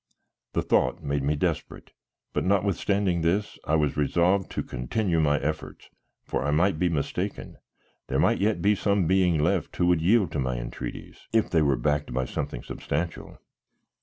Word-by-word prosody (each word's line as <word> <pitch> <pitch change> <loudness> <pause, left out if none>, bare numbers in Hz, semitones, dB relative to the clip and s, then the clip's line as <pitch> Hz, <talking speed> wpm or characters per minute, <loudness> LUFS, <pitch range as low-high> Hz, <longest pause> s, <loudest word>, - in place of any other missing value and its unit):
The - - 0
thought 65 - +1
made 70 0 -1
me 70 +3 +1
desperate, 75 - -3 0.4
but - - 0
notwithstanding 100 -1 +1
this 95 +6 0
I 80 - +2
was 75 -2 +1
resolved 85 +6 +2
to - - -3
continue 85 - -1
my 75 -2 +3
efforts, 75 +2 -5 0.3
for - - -2
I 75 - -1
might 80 +3 +2
be 90 - +2
mistaken; 75 -4 -3 0.5
there - - -1
might - - +3
yet 100 -4 +1
be 105 +1 +5
some 100 -2 +1
being 90 -1 +3
left 85 +2 0
who 90 - +1
would 90 -2 +3
yield 95 0 +3
to 75 - -2
my 65 -2 -1
entreaties, - - -7
if 115 -1 +2
they 80 - +4
were 70 -3 +2
backed 75 -4 -1
by 65 0 0
something - - -4
substantial. 85 +3 -4
85 Hz, 170 wpm, -26 LUFS, 75-95 Hz, 0.5 s, be